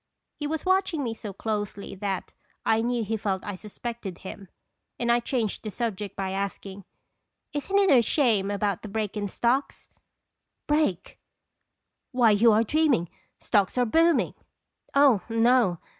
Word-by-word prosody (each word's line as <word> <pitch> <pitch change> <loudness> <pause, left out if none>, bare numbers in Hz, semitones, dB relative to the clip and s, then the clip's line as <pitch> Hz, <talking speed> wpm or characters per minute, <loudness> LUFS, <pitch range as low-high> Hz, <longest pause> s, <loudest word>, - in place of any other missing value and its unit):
He 295 - -4
was 315 +2 -3
watching 375 -5 +1
me 230 -3 -2
so 220 -2 -7
closely 205 0 -4
that 195 -1 -4 0.3
I 225 0 +3
knew 240 0 0
he 220 +1 -2
felt 195 -2 -2
I 205 - -4
suspected 210 -1 -7
him, 195 0 -10 0.5
and 235 - -2
1 240 0 +3
changed 235 -4 -2
the 215 - -5
subject 210 -2 -4
by 190 -1 -3
asking: 195 0 -5 0.3
" - - -54
Isn't 295 +7 -1
it 395 -2 +4
a 245 - +6
shame 225 -6 +2
about 200 -2 -1
the - - -7
break 210 0 -3
in 205 -1 -2
stocks?" 245 +7 -1 0.8
"Break! 295 - 0 0.9
Why, 245 -4 +4
you 220 +3 +5
are 215 +1 +4
dreaming. 265 - +2 0.3
Stocks 205 +1 +1
are 250 - +3
booming." 325 +6 +3 0.4
" - - -28
Oh, 275 -8 +5
no. 230 -4 +3
225 Hz, 160 wpm, -26 LUFS, 200-255 Hz, 0.9 s, a